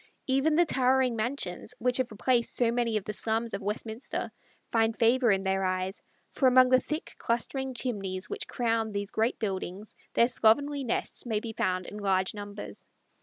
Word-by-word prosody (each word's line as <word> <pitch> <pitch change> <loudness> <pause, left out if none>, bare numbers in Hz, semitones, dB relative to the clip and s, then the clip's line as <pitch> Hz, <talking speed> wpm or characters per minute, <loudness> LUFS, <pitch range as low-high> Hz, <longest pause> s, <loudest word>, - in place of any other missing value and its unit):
Even 270 +4 +2
the 345 +2 +5
towering 260 -3 +2
mansions 225 -2 -2
which 250 +1 +1
have 255 -2 0
replaced 235 +3 0
so 235 -2 +2
many 235 -2 +1
of 210 - -3
the 210 - -4
slums 225 +2 -1
of - - -3
Westminster 220 +4 -3 0.4
find 225 0 +2
favor 240 +1 +4
in 195 -2 +2
their 190 0 0
eyes, 185 +1 -2 0.3
for 265 - +2
among 255 0 +6
the 255 0 +6
thick 305 +5 -5
clustering 260 +3 -1
chimneys 195 -7 -3
which - - -4
crown 225 -2 0
these 200 0 -3
great 225 +3 0
buildings 195 -1 -4 0.2
their 235 - +5
slovenly 275 +4 +3
nests 240 - -1
may 220 -3 0
be 225 0 -6
found 185 -3 -1
in 205 - -8
large 190 -2 +1
numbers. 205 0 -8
230 Hz, 175 wpm, -29 LUFS, 205-255 Hz, 0.4 s, among